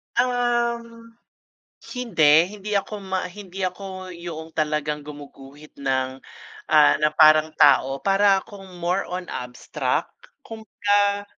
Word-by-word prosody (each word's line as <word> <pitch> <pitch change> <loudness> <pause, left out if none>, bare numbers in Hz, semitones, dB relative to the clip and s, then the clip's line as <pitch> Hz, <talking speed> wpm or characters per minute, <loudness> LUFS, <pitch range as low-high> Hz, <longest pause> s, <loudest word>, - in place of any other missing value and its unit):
Um, 235 -2 -1 0.9
hindi, 165 -10 +4
hindi 210 0 -8
ako 205 +1 -5
ma 190 -1 -3
hindi 195 -1 -8
ako 185 0 -7
yoong 165 -2 -8
talagang 150 -1 -2
gumuguhit 145 0 -13
ng 130 -1 -2 0.5
ah, 155 -1 +6
na 150 - +4
parang 155 0 +6
tao 135 +1 +4
para 195 0 +3
akong 195 -3 -13
more 175 +3 -1
on 180 +1 -5
abstract. 125 0 -3 0.3
Kumbaga 205 -2 0
185 Hz, 110 wpm, -23 LUFS, 150-205 Hz, 0.9 s, ah